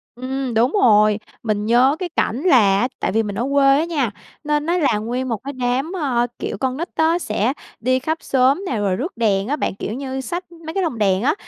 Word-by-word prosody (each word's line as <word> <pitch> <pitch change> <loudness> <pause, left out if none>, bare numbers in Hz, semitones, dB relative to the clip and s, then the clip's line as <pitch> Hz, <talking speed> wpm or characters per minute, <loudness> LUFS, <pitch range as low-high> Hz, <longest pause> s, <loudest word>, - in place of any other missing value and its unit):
Ừm, 260 0 -3
đúng 240 +5 +3
rồi. 210 -2 +5 0.2
Mình 210 -2 -1
nhớ 245 +5 +4
cái 365 -2 -3
cảnh 265 -5 -1
là 345 -9 +6 0.2
á 245 - +2
tại - - -1
vì 225 +2 +1
mình 205 -1 -5
ở 235 - -1
quê 275 -1 +5
á 320 - 0
nha, 285 -10 -1 0.3
nên 300 0 0
nó 345 +2 +1
là 285 -10 +2
nguyên 245 +4 -3
một 225 - -1
cái 280 - -5
đám, 255 +4 -1
ờ, 245 -4 +1
kiểu, - - -4
con 260 -1 -2
nít 340 +3 -4
á 325 +2 +2
sẽ 245 - -1 0.3
đi 255 +2 +1
khắp 315 +5 -2
xóm 270 +8 +2
nè, 245 - -2
rồi 200 -3 0
rước 270 - -5
đèn 205 -3 +1
á 290 - 0
bạn, 245 - -2
kiểu 210 - -5
như, 265 0 -4
xách 350 +5 -5
mấy 330 -1 -9
cái 390 -1 0
lồng 290 -9 -2
đèn 195 -2 +2
á, 275 - +3
260 Hz, 240 wpm, -20 LUFS, 225-300 Hz, 0.3 s, là